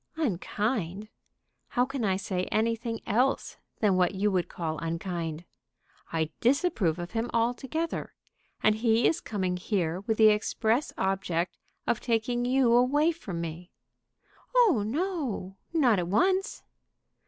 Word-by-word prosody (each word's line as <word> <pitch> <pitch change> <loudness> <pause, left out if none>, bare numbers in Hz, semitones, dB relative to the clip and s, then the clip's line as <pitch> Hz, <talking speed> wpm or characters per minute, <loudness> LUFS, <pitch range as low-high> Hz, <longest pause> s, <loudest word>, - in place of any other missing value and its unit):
"Unkind! 210 - -2 0.6
How 245 - +1
can 270 -2 -4
I 195 -3 +2
say 185 -1 -2
anything 230 +1 -1
else 250 +6 +1 0.2
than 205 -4 +4
what 180 +1 +2
you 205 +2 +1
would 180 -2 0
call 160 -2 -3
unkind? 165 -1 -3 0.7
I 160 -1 -1
disapprove 240 - +2
of 175 0 -6
him 230 +1 -2
altogether. 250 +8 -1 0.5
And 215 - +5
he 225 0 +3
is 330 - +2
coming 185 -4 -2
here 180 -3 -1
with 215 +2 -2
the 220 -1 +7
express 220 +4 +1
object 180 -3 -1 0.3
of 230 - +1
taking 240 +1 0
you 250 -1 +3
away 285 +7 +4
from 195 - -6
me." 170 +2 -6 0.9
"Oh 440 - +5
no; 255 - -2
not 255 - +3
at 175 - -2
once." 370 - +1
215 Hz, 130 wpm, -28 LUFS, 180-250 Hz, 0.9 s, the